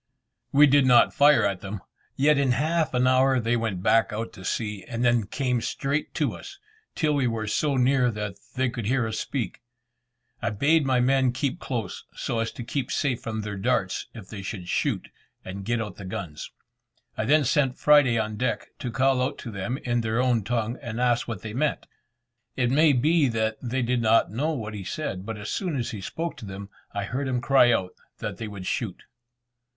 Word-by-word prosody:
We 145 +2 +7
did 140 -1 +4
not 120 -2 +6
fire 145 -3 +5
at 100 -2 -1
them, 100 0 -6 0.3
yet 145 +1 +4
in 135 -3 +3
half 155 +3 0
an 125 0 +3
hour 130 0 +4
they 115 +1 +1
went 110 -6 -2
back 115 -1 +3
out 110 +2 -4
to 95 - -11
sea, 105 0 -3
and 120 0 -2
then 120 -4 +3
came 125 0 -1
straight 140 +5 -2
to - - 0
us, 390 -1 -10 0.4
till 155 -2 +1
we 140 -3 +2
were 115 -2 -2
so 140 +6 0
near 130 0 +3
that 105 -3 -4 0.2
they 130 0 +1
could 120 -3 -4
hear 125 0 +2
us 110 0 -3
speak. 130 -5 -4 0.8
I - - 0
bade 145 +7 +2
my 130 -2 +3
men 130 0 +3
keep 140 +6 -2
close, 115 - -4
so 115 - -2
as 115 0 -1
to 120 - -7
be 125 +1 -2
safe 130 -5 -1
from 110 -1 -3
their 105 -1 -5
darts 105 -3 0
if 110 -5 -9
they 100 -2 -7
should 95 -2 -6
shoot, - - -1 0.4
and 95 +1 -6
get 120 +2 0
out 105 -5 -5
the 100 - -8
guns. 90 -4 -6 0.7
I 110 - -2
then 150 +5 +4
sent 135 -2 +1
Friday 145 -6 +5
on 110 -1 -2
deck, 125 -1 -2
to 125 - -3
call 130 +2 +2
out 130 - -1
to 115 - -7
them 100 +6 -3
in 120 -1 0
their 115 +1 -1
own 125 -4 +2
tongue 115 +2 -2
and 115 -3 -5
ask 120 -1 +2
what 110 -5 -5
they 110 -1 -6
meant. 145 +4 0 0.7
It 125 -2 +1
may 150 +2 +5
be 150 +4 +3
that 110 -2 -1
they 125 +1 -1
did 120 0 +1
not 110 -3 +3
know 140 +9 -1
what 110 -9 -4
he 100 -2 -6
said, 95 -3 -4
but 110 -1 -4
as 105 0 -5
soon 180 -6 -2
as 120 -3 -2
he 105 - -6
spoke 165 - -4
to 120 - -9
them 100 0 -8 0.2
I 100 - -3
heard 130 +7 -3
him 125 -1 0
cry 125 0 +5
out 90 -5 0 0.2
that - - -5
they 115 - -5
would 100 -3 -8
shoot. 100 -1 -3
120 Hz, 210 wpm, -26 LUFS, 110-135 Hz, 0.8 s, We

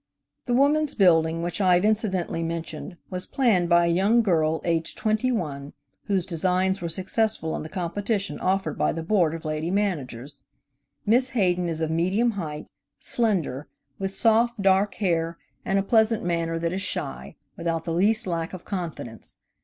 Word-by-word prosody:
The 245 - +1
Woman's 290 +2 +3
Building, 165 -4 +3
which 175 +3 -2
I 185 -2 +5
have 180 +3 +2
incidentally 200 -6 0
mentioned, 165 +1 -5
was 180 0 -3
planned 205 -10 +2
by 170 0 +5
a 170 - +2
young 210 +7 +3
girl, 160 -5 +1
aged 165 -1 -1
twenty 215 +4 +1
one, 145 - -4 0.3
whose 195 -5 0
designs 185 +2 0
were 170 - -3
successful 185 -1 0
in - - -4
the 155 - -7
competition 195 +3 -2
offered 185 -4 -1
by - - +2
the 165 +1 -4
Board 170 -3 +2
of 165 - -9
Lady 155 +2 -2
Managers. 145 - -2 0.7
Miss 250 +4 +4
Hayden 180 -3 +2
is 165 -1 -1
of 160 0 -1
medium 190 +9 +1
height, 160 -8 -5 0.3
slender, 180 - +1 0.3
with 195 0 -2
soft, 230 +2 +2
dark 195 +1 +3
hair, 170 -4 -1 0.3
and 195 - 0
a 195 - +2
pleasant 220 +1 +2
manner 170 -1 -1
that 165 +1 -2
is 190 - -2
shy, - - -4 0.2
without 165 -1 -2
the 165 - -3
least 210 +6 +2
lack 165 -2 -3
of 185 - -8
confidence. 165 - -6
180 Hz, 170 wpm, -25 LUFS, 165-205 Hz, 0.7 s, I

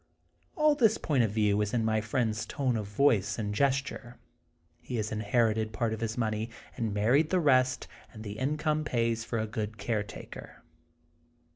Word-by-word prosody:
All 305 -3 +4
this 225 -7 +3
point 140 -5 +1
of 115 - +2
view 105 -1 +2
is 105 +2 -1
in 115 -2 +1
my 110 -1 +1
friend's 110 0 -1
tone 130 -5 -1
of 105 -3 -3
voice 105 -2 +2
and 105 -2 -2
gesture. 135 0 -1 0.6
He 125 - -6
has 110 -1 -2
inherited 110 0 +1
part 110 0 -1
of 110 - -4
his 115 0 -2
money, 110 -1 -1 0.3
and 115 -2 -2
married 120 +10 +3
the 185 - +2
rest, 130 -5 +3 0.2
and 110 -2 -10
the 105 0 -6
income 150 +3 0
pays 115 -5 0
for 115 - -3
a 110 - 0
good 110 0 -4
caretaker. 105 0 -5
115 Hz, 170 wpm, -29 LUFS, 110-130 Hz, 0.6 s, All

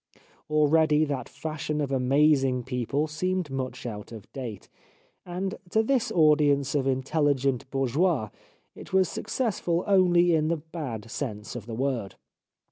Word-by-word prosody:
Already 155 0 +4
that 140 -3 -4
fashion 150 +1 -4
of 145 -2 -1
amazing 135 -1 +3
people 130 +3 -1
seemed 180 +1 -2
much 130 -2 -4
out 105 -3 -6
of 110 -3 -9
date, 120 -8 -6 0.6
and 185 +2 -3 0.2
to 220 +4 +2
this 250 0 +1
audience 145 -4 +4
of 140 -2 +1
intelligent 135 -1 0
bourgeois 135 - +1 0.4
it - - -12
was 190 -1 +4
successful 185 -8 -1
only 175 -3 +4
in 155 -1 +2
the 165 +1 +1
bad 145 -9 -7
sense 115 -5 -5
of 120 -2 -7
the 115 - -5
word. 125 -5 -2
145 Hz, 135 wpm, -27 LUFS, 130-165 Hz, 0.6 s, Already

